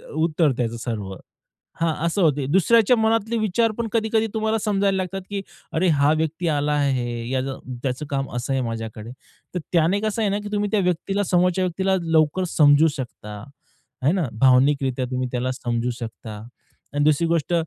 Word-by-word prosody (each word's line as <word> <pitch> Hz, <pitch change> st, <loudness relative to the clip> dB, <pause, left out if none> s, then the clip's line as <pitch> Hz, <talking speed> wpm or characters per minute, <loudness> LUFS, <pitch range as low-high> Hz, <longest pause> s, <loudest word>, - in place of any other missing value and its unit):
उत्तर 160 Hz, -1 st, +2 dB
त्याचं 120 Hz, -1 st, -2 dB
सर्व. 105 Hz, -5 st, -4 dB, 0.7 s
हां, 165 Hz, -1 st, +2 dB
असं 170 Hz, +4 st, 0 dB
होते. 145 Hz, -5 st, +2 dB
दुसऱ्याच्या 225 Hz, +6 st, +5 dB
मनातले 225 Hz, +1 st, +1 dB
विचार 220 Hz, +1 st, +1 dB
पण 235 Hz, -1 st, -2 dB
कधी-कधी 220 Hz, -1 st, +1 dB
तुम्हाला 220 Hz, 0 st, 0 dB
समजायला 200 Hz, -2 st, +1 dB
लागतात, 190 Hz, +1 st, -3 dB
की 200 Hz, -1 st, -3 dB, 0.3 s
"अरे 175 Hz, +4 st, +2 dB
हा 140 Hz, +1 st, +4 dB
व्यक्ती 160 Hz, +2 st, -2 dB
आला 145 Hz, +1 st, 0 dB
आहे, 125 Hz, -5 st, -1 dB
याला 135 Hz, +1 st, -1 dB, 0.3 s
त्याचं 130 Hz, +2 st, -2 dB
काम 135 Hz, -1 st, -2 dB
असं 120 Hz, +2 st, -3 dB
आहे 135 Hz, -, +1 dB
माझ्याकडे." 115 Hz, -1 st, -5 dB, 0.4 s
तर -, -, 0 dB
त्याने 170 Hz, +4 st, +3 dB
कसं 215 Hz, +1 st, -1 dB
आहे 210 Hz, -, +2 dB
ना, 200 Hz, +1 st, 0 dB
की 205 Hz, -, -7 dB
तुम्ही 205 Hz, 0 st, 0 dB
त्या 215 Hz, -, +2 dB
व्यक्तीला 180 Hz, +3 st, 0 dB
समोरच्या 180 Hz, 0 st, +2 dB
व्यक्तीला 190 Hz, +2 st, 0 dB
लवकर 165 Hz, +1 st, +2 dB
समजू 145 Hz, +1 st, +6 dB
शकता, 105 Hz, -5 st, -7 dB, 0.6 s
हे 145 Hz, -, +5 dB
ना. 180 Hz, -5 st, 0 dB
भावनिकरित्या 130 Hz, 0 st, +3 dB
तुम्ही 130 Hz, 0 st, -1 dB
त्याला 125 Hz, +1 st, -1 dB
समजू 120 Hz, -1 st, -2 dB
शकता. 115 Hz, -1 st, -7 dB, 0.6 s
आणि 145 Hz, 0 st, +1 dB
दुसरी 155 Hz, +2 st, +3 dB
गोष्ट, 165 Hz, 0 st, 0 dB
160 Hz, 170 wpm, -23 LUFS, 130-195 Hz, 0.7 s, समजू